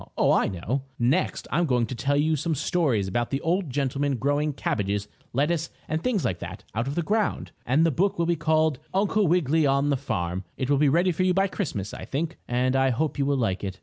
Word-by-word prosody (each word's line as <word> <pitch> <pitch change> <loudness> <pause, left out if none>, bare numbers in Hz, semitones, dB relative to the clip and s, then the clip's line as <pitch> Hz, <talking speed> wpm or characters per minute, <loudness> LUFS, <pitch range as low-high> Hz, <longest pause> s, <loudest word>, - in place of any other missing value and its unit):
Oh, - - +4
I - - +3
know. 105 +9 -2 0.2
Next 130 +10 0
I'm 175 -1 +2
going 125 -3 +2
to 115 - -6
tell 140 +4 0
you 155 +2 +2
some 160 +2 -1
stories 135 - +1
about 120 +5 -1
the 135 - -1
old 175 0 0
gentleman 140 +1 0
growing 145 +4 +1
cabbages, 105 -6 -2 0.2
lettuce 155 +5 0 0.2
and 155 +1 -1
things 235 -8 0
like 90 -3 -1
that - - -7
out 115 +3 -1
of 140 - -3
the 170 - 0
ground, 210 +5 -1 0.2
and 145 +7 +4
the 165 - +3
book 190 +8 +1
will 170 - +1
be 170 0 +2
called 155 -2 +1 0.2
"Uncle 205 0 +2
Wiggily 160 -2 +3
on 140 +1 +2
The 140 - +2
Farm." 95 -8 -3
It 130 +1 -1
will 140 - +3
be 150 -1 +4
ready 175 +5 +3
for 170 - -2
you 185 -1 +2
by 195 0 +3
Christmas, 130 - -4
I - - -7
think, 160 +4 -3
and 125 +2 +1
I 135 0 +3
hope 140 +4 -1
you 140 - +1
will 140 -1 +2
like 105 -7 -1
it. 95 -1 -4
145 Hz, 235 wpm, -26 LUFS, 125-165 Hz, 0.2 s, Oh